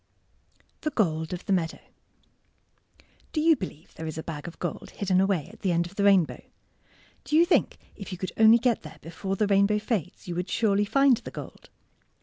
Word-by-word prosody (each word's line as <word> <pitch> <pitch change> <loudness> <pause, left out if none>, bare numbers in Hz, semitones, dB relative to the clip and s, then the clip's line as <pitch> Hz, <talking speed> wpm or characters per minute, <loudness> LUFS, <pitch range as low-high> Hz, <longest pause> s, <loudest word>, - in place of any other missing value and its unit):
THE 305 - -1
GOLD 160 - 0
OF 180 -1 -6
THE 195 - +1
MEADOW 165 -3 0 1.6
Do 310 - 0
you 320 +1 +5
believe 180 - -8
there 160 - -7
is 155 - -5
a 160 - -4
bag 155 -1 -6
of 170 - -9
gold 175 - -5
hidden 190 -2 +2
away 190 -6 0
at - - -15
the 190 - 0
end 170 0 +1
of 175 - -10
the 200 - 0
rainbow? 195 -5 +3 0.8
Do 300 - -2
you 335 +2 +6
think 360 - +2 0.2
if 200 -2 -9
you 185 - -5
could 185 +1 -4
only 220 +1 +7
get 235 -1 +1
there 155 - -11
before 190 +4 -4
the 210 - +1
rainbow 200 +1 +3
fades 210 -3 -3
you 175 - -3
would 180 +2 -3
surely 205 -2 +2
find 275 +2 +4
the - - -9
gold? - - -10
195 Hz, 200 wpm, -27 LUFS, 170-220 Hz, 1.6 s, only